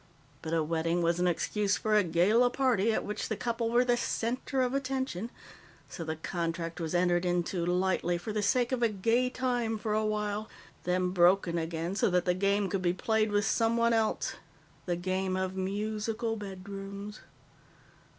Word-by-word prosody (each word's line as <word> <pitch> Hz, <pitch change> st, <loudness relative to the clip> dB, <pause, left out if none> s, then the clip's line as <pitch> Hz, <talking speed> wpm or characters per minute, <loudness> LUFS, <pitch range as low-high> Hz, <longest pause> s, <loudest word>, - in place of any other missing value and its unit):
But 160 Hz, -, -5 dB
a 165 Hz, -1 st, +2 dB
wedding 165 Hz, +2 st, 0 dB
was 170 Hz, +1 st, +1 dB
an 180 Hz, -, +2 dB
excuse 205 Hz, +4 st, 0 dB
for 215 Hz, -1 st, +1 dB
a 210 Hz, -, +5 dB
gala 190 Hz, +9 st, +3 dB
party 245 Hz, -5 st, +2 dB
at -, -, -1 dB
which 210 Hz, -, -4 dB
the 220 Hz, -, 0 dB
couple 230 Hz, +1 st, -1 dB
were 240 Hz, +2 st, +3 dB
the 245 Hz, -1 st, +3 dB
center 250 Hz, +3 st, -1 dB
of 250 Hz, 0 st, -1 dB
attention. 260 Hz, -6 st, -2 dB, 0.6 s
So 170 Hz, -, -6 dB
the 160 Hz, 0 st, -3 dB
contract 165 Hz, +1 st, -3 dB
was 165 Hz, +1 st, -2 dB
entered 175 Hz, 0 st, +2 dB
into 175 Hz, 0 st, 0 dB
lightly 180 Hz, -1 st, +1 dB
for 210 Hz, +5 st, -5 dB
the 210 Hz, -, 0 dB
sake 240 Hz, +4 st, +2 dB
of 255 Hz, -2 st, 0 dB
a 235 Hz, -, +4 dB
gay 225 Hz, +5 st, +1 dB
time 245 Hz, -3 st, -1 dB
for 210 Hz, 0 st, -2 dB
a 215 Hz, 0 st, +1 dB
while, 210 Hz, 0 st, -2 dB, 0.4 s
then 180 Hz, 0 st, +1 dB
broken 175 Hz, -1 st, +3 dB
again 165 Hz, +2 st, -3 dB
so -, -, +2 dB
that 180 Hz, -1 st, +1 dB
the 180 Hz, -, +3 dB
game 200 Hz, +2 st, +1 dB
could 190 Hz, 0 st, -2 dB
be 175 Hz, -1 st, +2 dB
played 215 Hz, +3 st, +1 dB
with 205 Hz, 0 st, +2 dB
someone 230 Hz, +1 st, +2 dB
else 225 Hz, -1 st, 0 dB, 0.5 s
the 175 Hz, -, +1 dB
game 185 Hz, +1 st, -1 dB
of 190 Hz, 0 st, -2 dB
Musical 215 Hz, +4 st, -2 dB
Bedrooms." 200 Hz, 0 st, -7 dB
200 Hz, 180 wpm, -30 LUFS, 180-225 Hz, 0.6 s, a